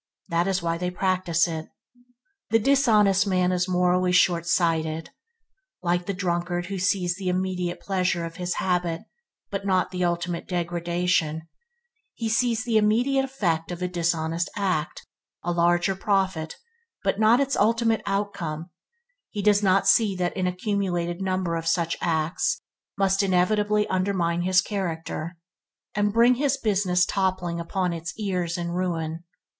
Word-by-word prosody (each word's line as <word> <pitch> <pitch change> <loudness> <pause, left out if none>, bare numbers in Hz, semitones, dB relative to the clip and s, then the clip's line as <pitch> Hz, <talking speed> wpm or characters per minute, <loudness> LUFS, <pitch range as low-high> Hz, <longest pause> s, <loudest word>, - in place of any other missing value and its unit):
This 170 +2 +1
is 190 -2 0
why 165 0 -1
they 180 0 -1
practice 180 -2 +1
it. 160 -2 -5 0.8
The 225 - +4
dishonest 215 -6 +3
man 185 -1 +2
is 180 0 0
morally 180 0 +2
short 175 -1 +3
sighted. 160 -2 0 0.7
Like 175 0 0
the 200 - -1
drunkard 175 -1 -1
who 195 +1 -4
sees 185 -1 +1
the 190 -2 -2
immediate 180 -1 -2
pleasure 180 -3 -1
of 165 +1 -8
his 180 -1 -2
habit, 175 -3 -1 0.5
but 195 -1 -3
not 185 -2 +1
the 180 -1 -2
ultimate 175 0 -2
degradation, 170 -2 -1 0.7
he 225 -1 -3
sees 230 0 +1
the 235 -3 +1
immediate 240 +6 +2
effect 175 -12 -1
of 175 +1 -5
a - - +1
dishonest 170 -1 -1
act 185 -7 -2 0.2
– - - -67
a 175 - -1
larger 175 +2 +2
profit 190 -5 -1 0.5
but 195 0 0
not 220 +3 +5
its 275 0 +1
ultimate 225 +1 +2
outcome; 175 -5 -3 0.6
he 205 -2 -4
does 205 0 +4
not 195 -1 +3
see 215 -4 +4
that 180 -1 -2
an 185 -1 0
accumulated 180 -2 -2
number 185 -3 -1
of 165 0 -4
such 170 -1 +1
acts 165 - 0 0.4
must 195 0 +2
inevitably 205 +3 +2
undermine 185 -3 0
his 185 +2 +3
character, 170 -4 -4 0.6
and 205 0 +1
bring 235 +3 +5
his 275 +2 +1
business 190 -6 +2
toppling 185 -3 -1
about 180 +1 -1
his 165 -1 -6
ears 180 -5 -2
in 170 -1 -3
ruin. 170 -2 -2
180 Hz, 150 wpm, -25 LUFS, 170-200 Hz, 0.8 s, not